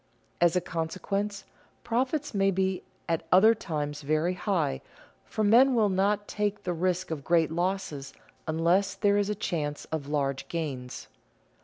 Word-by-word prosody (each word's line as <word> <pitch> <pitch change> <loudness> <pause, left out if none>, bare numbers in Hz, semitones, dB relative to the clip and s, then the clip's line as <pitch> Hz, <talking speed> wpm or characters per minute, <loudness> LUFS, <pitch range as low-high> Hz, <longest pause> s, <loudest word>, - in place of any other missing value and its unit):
As 175 0 +4
a 180 - +3
consequence, 195 +5 -3 0.4
profits 265 +5 -1
may 195 -1 +3
be 190 0 0 0.3
at 165 -2 0
other 215 +5 +7
times 150 -8 -4
very 155 +5 +1
high, 180 - -1 0.4
for 215 - -2
men 245 +5 +6
will 215 -3 +3
not 200 +2 +1
take 205 -1 -2
the 180 - -1
risk 180 +1 -1
of 150 -3 -4
great 165 0 +2
losses 170 -5 -2 0.4
unless 175 +5 +2
there 205 0 +3
is 205 0 0
a 210 - 0
chance 150 -7 -3
of 155 -3 -3
large 140 -2 -1
gains. 135 -7 -5
185 Hz, 150 wpm, -28 LUFS, 160-205 Hz, 0.4 s, other